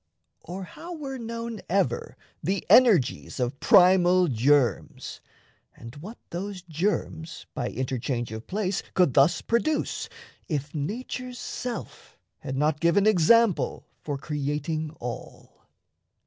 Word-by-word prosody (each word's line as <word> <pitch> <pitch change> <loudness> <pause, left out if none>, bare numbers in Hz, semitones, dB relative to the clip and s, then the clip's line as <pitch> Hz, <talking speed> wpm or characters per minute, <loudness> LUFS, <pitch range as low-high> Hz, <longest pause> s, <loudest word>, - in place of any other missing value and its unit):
Or 185 +3 -7
how 340 - -9
were 270 -4 -6
known 230 -1 -5
Ever 175 -10 0 0.2
the 190 +5 -1
energies 200 - +4
of 125 +2 -2
primal 180 0 +6
germs, 130 -1 +1 0.5
And 115 0 -11
what 200 +11 -9
those 185 +1 -5
germs, 165 -1 -3
by - - -2
interchange 125 -2 -3
of 110 +1 -7
place, 195 -1 -1
Could 180 -8 +4
thus 150 +5 +4
produce, 295 +7 0 0.4
if 145 -3 -3
nature's 245 - -4
self 245 -2 -6 0.2
had 130 - -5
not 150 +1 +1
Given 170 +5 +3
example 215 +1 +3 0.2
for 145 -2 -3
creating 150 +2 -2
all? 120 0 -8
175 Hz, 115 wpm, -26 LUFS, 145-210 Hz, 0.5 s, primal